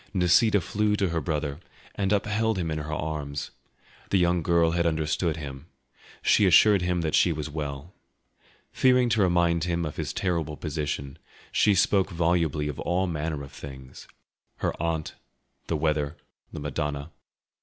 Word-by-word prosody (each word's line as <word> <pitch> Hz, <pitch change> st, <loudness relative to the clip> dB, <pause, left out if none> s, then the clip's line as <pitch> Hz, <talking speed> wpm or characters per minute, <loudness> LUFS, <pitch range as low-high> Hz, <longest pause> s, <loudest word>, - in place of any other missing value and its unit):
Nisida 95 Hz, +4 st, +4 dB
flew 105 Hz, +4 st, 0 dB
to 100 Hz, -3 st, 0 dB
her 85 Hz, -1 st, -1 dB
brother 75 Hz, -2 st, -2 dB, 0.3 s
and 95 Hz, -1 st, -1 dB
upheld 105 Hz, +1 st, +1 dB
him 85 Hz, -3 st, -2 dB
in 80 Hz, -, -2 dB
her 75 Hz, +1 st, -5 dB
arms. 75 Hz, -2 st, -4 dB, 0.6 s
The 100 Hz, -, +3 dB
young 90 Hz, -1 st, +2 dB
girl 85 Hz, 0 st, +3 dB
had 85 Hz, 0 st, +1 dB
understood 80 Hz, +1 st, 0 dB
him; 70 Hz, 0 st, -8 dB, 0.6 s
she 100 Hz, -, +4 dB
assured 100 Hz, +2 st, +6 dB
him 90 Hz, -1 st, 0 dB
that 80 Hz, -2 st, -2 dB
she 90 Hz, -, +4 dB
was 75 Hz, -1 st, -4 dB
well. 75 Hz, +2 st, -5 dB, 0.8 s
Fearing 125 Hz, -1 st, +3 dB
to 110 Hz, -2 st, +2 dB
remind 85 Hz, -2 st, +2 dB
him 85 Hz, -1 st, -1 dB
of 75 Hz, -, -6 dB
his -, -, -3 dB
terrible 80 Hz, -5 st, -2 dB
position, 75 Hz, -3 st, -4 dB, 0.3 s
she 105 Hz, -2 st, +3 dB
spoke 95 Hz, +1 st, +3 dB
volubly 85 Hz, -4 st, 0 dB
of 75 Hz, -, -5 dB
all 90 Hz, +3 st, 0 dB
manner 80 Hz, -3 st, -3 dB
of 70 Hz, -, -10 dB
things—her 65 Hz, -2 st, -8 dB
aunt, 80 Hz, -2 st, -2 dB, 0.5 s
the 80 Hz, -, 0 dB
weather, 75 Hz, 0 st, -1 dB, 0.3 s
the -, -, -6 dB
Madonna. 75 Hz, +1 st, -3 dB
80 Hz, 155 wpm, -26 LUFS, 75-90 Hz, 0.8 s, assured